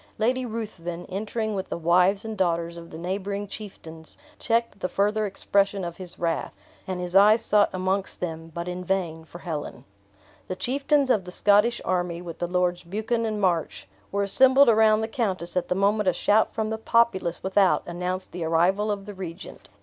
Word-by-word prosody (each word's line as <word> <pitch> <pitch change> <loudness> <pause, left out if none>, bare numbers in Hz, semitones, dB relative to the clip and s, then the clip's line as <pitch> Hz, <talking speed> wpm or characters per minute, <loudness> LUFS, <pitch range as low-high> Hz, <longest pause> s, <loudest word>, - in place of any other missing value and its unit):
Lady 250 +3 0
Ruthven, 180 -7 -5
entering 215 +3 -3
with 190 -1 -4
the - - -3
wives 180 +5 +3
and 220 -1 -4
daughters 170 -3 0
of 170 0 -10
the 160 - -9
neighboring 200 +4 -3
chieftains, 165 -6 -10 0.2
checked 230 -2 0
the 185 - -2
further 210 +2 +1
expression 200 0 0
of 170 -1 -5
his 185 -2 -8
wrath, 165 -1 -2 0.3
and 185 -1 -3
his 180 0 -4
eyes 210 +3 +6
sought 210 -1 +4
amongst 190 +1 -1
them, 165 -2 -5
but 170 +2 -5
in 180 0 -4
vain, 175 -4 -2
for 170 - -11
Helen. 160 -5 -6 0.6
The 185 - -3
chieftains 275 +4 +1
of 200 -6 +1
the 180 - -8
Scottish 210 +5 +3
army, 175 -2 -1
with 170 -2 -8
the 175 - -1
Lords 180 0 0
Buchan 220 +6 -2
and 215 -1 -2
March, 175 -5 -1 0.2
were 200 0 0
assembled 265 +6 +5
around 220 -1 +5
the 220 - -1
countess 190 -7 -2
at 180 - 0
the 180 - 0
moment 200 +1 +2
a - - +1
shout 210 +5 +2
from 220 -1 -2
the 220 - -3
populace 220 -7 +1
without 190 0 +3
announced 180 +2 -4
the 175 -1 -5
arrival 175 +6 +2
of 200 -1 -3
the 205 - -7
regent. 185 -1 -9
190 Hz, 190 wpm, -25 LUFS, 175-215 Hz, 0.6 s, eyes